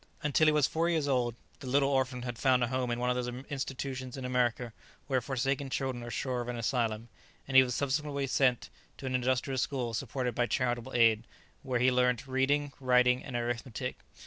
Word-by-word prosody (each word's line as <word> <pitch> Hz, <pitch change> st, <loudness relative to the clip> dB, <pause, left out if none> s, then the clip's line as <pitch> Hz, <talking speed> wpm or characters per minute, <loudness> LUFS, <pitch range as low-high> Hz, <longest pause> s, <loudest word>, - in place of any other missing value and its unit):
Until 150 Hz, +1 st, +3 dB
he -, -, +6 dB
was 150 Hz, -2 st, +3 dB
four 165 Hz, +3 st, 0 dB
years 160 Hz, -4 st, +1 dB
old 125 Hz, -4 st, +1 dB, 0.2 s
the 135 Hz, -, -8 dB
little 135 Hz, +2 st, +3 dB
orphan 130 Hz, -2 st, 0 dB
had 120 Hz, -2 st, -5 dB
found 130 Hz, -2 st, +3 dB
a 120 Hz, -, 0 dB
home 130 Hz, -1 st, -1 dB
in 120 Hz, 0 st, -1 dB
one 125 Hz, 0 st, +1 dB
of -, -, 0 dB
those 125 Hz, -1 st, -2 dB, 0.2 s
institutions 130 Hz, -1 st, -4 dB
in 130 Hz, -, -5 dB
America 125 Hz, -2 st, 0 dB, 0.3 s
where 130 Hz, -3 st, 0 dB
forsaken 135 Hz, +2 st, -1 dB
children 130 Hz, -2 st, -2 dB
are 120 Hz, -, -6 dB
sure 125 Hz, 0 st, -2 dB
of 120 Hz, -, -6 dB
an 120 Hz, -1 st, -3 dB
asylum, 115 Hz, -2 st, -1 dB, 0.4 s
and 135 Hz, -, -4 dB
he 130 Hz, -, +11 dB
was 125 Hz, -2 st, -1 dB
subsequently 140 Hz, 0 st, -1 dB
sent 130 Hz, -2 st, +1 dB, 0.3 s
to -, -, -9 dB
an 130 Hz, -, -2 dB
industrial 130 Hz, +1 st, 0 dB
school 125 Hz, -3 st, -1 dB
supported 125 Hz, +1 st, -2 dB
by 120 Hz, 0 st, +1 dB
charitable 120 Hz, +2 st, -1 dB
aid, 115 Hz, -1 st, +4 dB, 0.3 s
where 130 Hz, -3 st, -1 dB
he 130 Hz, +2 st, +4 dB
learnt 125 Hz, -1 st, +2 dB
reading, 140 Hz, +2 st, +1 dB
writing, 125 Hz, -1 st, +3 dB
and 130 Hz, -, -7 dB
arithmetic. 120 Hz, +1 st, -3 dB
125 Hz, 200 wpm, -31 LUFS, 120-135 Hz, 0.4 s, he